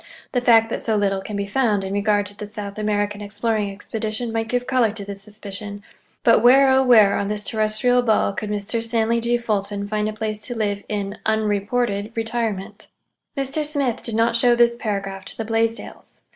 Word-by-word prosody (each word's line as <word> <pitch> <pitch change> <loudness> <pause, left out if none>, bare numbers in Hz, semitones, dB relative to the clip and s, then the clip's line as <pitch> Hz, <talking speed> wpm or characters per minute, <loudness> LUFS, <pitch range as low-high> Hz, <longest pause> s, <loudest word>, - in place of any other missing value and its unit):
The 245 - 0
fact 225 -2 +5
that - - -1
so 220 - 0
little 195 -2 +1
can 210 +2 -6
be 200 0 -2
found 210 -2 +1
in 190 0 -4
regard 205 0 +1
to 205 +1 -11
the 210 - -7
South 205 -1 -7
American 205 -1 -1
exploring 210 0 -1
expedition 220 +3 -4
might 225 0 -1
give 245 +1 -1
color 255 -4 +2
to 205 -2 -7
this 200 0 -6
suspicion; 205 0 -8 0.4
but 230 - +5
where 255 -4 +6
on 200 - -1
this 210 0 -2
terrestrial 220 +4 +1
ball 220 -4 +2
could 210 +1 -4
Mr. 210 +2 -2
Stanley 230 0 +1
G. 240 +1 +1
Fulton 205 -3 -2
find 210 0 -1
a - - -5
place 215 -1 -4
to 245 - -4
live 205 -2 -1
in 200 -1 -3
unreported 215 0 0
retirement? 225 -3 -3 0.5
Mr. 275 +3 0
Smith 285 -5 -1
did 230 - -2
not 230 +1 +2
show 240 0 +4
this 235 0 +4
paragraph 195 -4 -4
to - - -6
the 225 - -3
Blaisdells. 225 +1 -3
215 Hz, 185 wpm, -22 LUFS, 205-235 Hz, 0.5 s, where